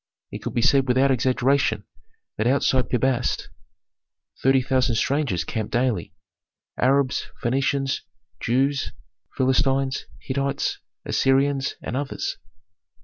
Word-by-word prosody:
It - - -5
could - - -5
be 115 - +2
said 135 0 +4
without 130 +2 +3
exaggeration 130 +2 +2 0.5
that 110 - 0
outside 130 -1 +2
Pi 125 - +2
Bast 125 0 0 0.9
thirty 135 0 +4
thousand 130 -2 +1
strangers 130 - 0
camped 110 +5 -4
daily, 120 -1 0 0.6
Arabs, 135 0 +2 0.2
Phœnicians, 135 +2 0 0.4
Jews, 135 +3 0 0.4
Philistines, 135 +1 +1
Hittites, 140 +1 -2 0.3
Assyrians, 135 +1 +2
and 120 - -4
others. 140 +1 -3
130 Hz, 105 wpm, -24 LUFS, 125-135 Hz, 0.9 s, said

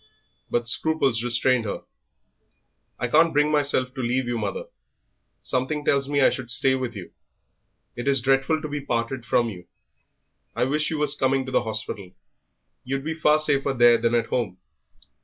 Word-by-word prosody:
But 120 -1 -1
scruples 135 -2 +1
restrained 120 0 +2
her. 100 - -4 1.1
"I 125 - -2
can't 160 +6 +4
bring 150 +1 +2
myself 140 -4 0
to 135 - -5
leave 125 +2 0
you, 120 0 -2
mother; 105 -4 -3 0.8
something 145 +4 -1
tells 140 0 +1
me 145 -1 +1
I - - +5
should 125 -3 -6
stay 130 +2 +2
with 130 -3 -3
you. 95 -4 -8 0.8
It 120 +3 -5
is 135 -1 +3
dreadful 135 +5 +1
to - - -2
be 145 -1 -4
parted 120 -1 -2
from 115 +1 +2
you. 90 -4 -10 0.9
I - - +1
wish 150 +3 0
you 160 - -2
was 150 -1 +2
coming 135 -1 +1
to 130 - -6
the - - +2
hospital; 110 -4 -5 0.7
you'd 135 +1 -3
be 160 +2 -2
far 155 -1 +3
safer 140 -2 +1
there 120 -2 +5
than 115 +1 +1
at 115 -1 +2
home." 110 -8 -2
130 Hz, 175 wpm, -24 LUFS, 120-145 Hz, 1.1 s, I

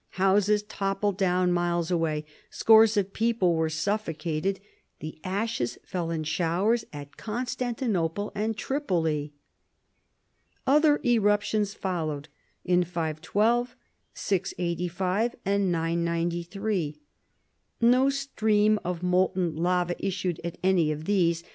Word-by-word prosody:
Houses 200 +2 +3
toppled 195 -1 -1
down 180 -2 +2
miles 175 -1 0
away. 160 -3 0 0.2
Scores 220 -1 +5
of 195 -1 0
people 225 -6 +2
were 160 -1 +1
suffocated. 165 0 -2 0.4
The 155 0 -8
ashes 190 - -2
fell 175 -3 -3
in 160 -1 -2
showers 180 +9 +1
at 145 -1 -10
Constantinople 225 -5 -2
and 215 +1 -2
Tripoli. 165 - -1 1.3
Other 295 +2 +4
eruptions 210 -3 +2
followed 155 -5 -3 0.4
in 180 0 +3
512, 180 +9 0 0.4
685, 185 +3 -1
and 200 -1 +1
993. 170 +1 -1 0.8
No 250 +3 +4
stream 215 -6 +1
of 180 0 -4
molten 180 -2 +1
lava 175 +1 +1
issued 185 -3 -2
at 170 0 -5
any 180 -5 +3
of 155 +1 -5
these. 170 -4 +1
185 Hz, 105 wpm, -27 LUFS, 170-210 Hz, 1.3 s, Scores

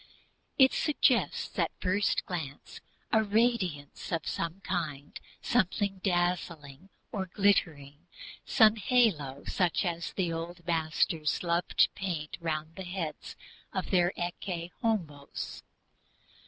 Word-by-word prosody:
It 265 -1 +7
suggests 300 - +1
at - - +3
first 185 +1 +1 0.9
a 220 -1 +4
radiance 205 - 0
of 165 -3 -1
some 170 +3 -3
kind, 155 -7 -3 0.2
something 200 -3 +1
dazzling 175 -4 -1 0.2
or 190 -3 -3
glittering, 165 -6 +1 0.4
some 220 0 +5
halo 190 - +2
such 180 0 +1
as 170 -3 -3
the 175 -3 0
old 170 +1 -6
masters 160 -1 +1
loved 170 0 -1
to - - +7
paint 170 -6 -4
round 155 -1 -2
the 190 - -5
head 175 -3 -3 0.6
of - - -3
their 175 -2 +4
Ecce 175 0 -4
Homos. 165 -11 -2
175 Hz, 110 wpm, -30 LUFS, 160-195 Hz, 0.9 s, It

